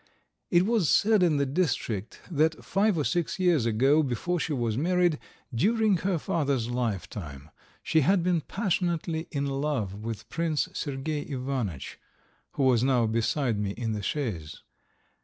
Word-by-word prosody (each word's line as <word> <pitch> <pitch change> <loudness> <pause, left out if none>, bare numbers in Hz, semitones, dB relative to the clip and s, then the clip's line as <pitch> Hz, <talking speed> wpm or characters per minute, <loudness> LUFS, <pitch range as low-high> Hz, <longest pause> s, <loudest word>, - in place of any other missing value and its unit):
It 175 +1 +4
was 215 -7 +2
said 215 -1 +4
in 165 -5 +3
the 140 - +2
district 130 - -2
that 160 0 +1
five 200 -1 +2
or 150 - +1
six 175 +4 -1
years 175 -10 +2
ago, 135 +7 +4
before 155 +6 -1
she 160 - -2
was 120 -6 0
married, 175 +2 +2 0.3
during 215 - +3
her 185 +1 0
father's 140 -7 -1
lifetime, 90 - -4 0.3
she 160 - +3
had 180 +4 +3
been 175 -2 +2
passionately 170 -4 -1
in 140 -2 -2
love 135 -7 -1
with 110 +1 -6
Prince 165 -2 -1
Sergey 145 +1 -3
Ivanitch, 125 - -4 0.5
who 140 - -1
was 125 -3 +4
now 130 -3 +3
beside 115 +1 0
me 100 -1 -2
in 115 -1 -2
the 105 -1 -3
chaise. 100 - -4
140 Hz, 150 wpm, -27 LUFS, 115-170 Hz, 0.5 s, It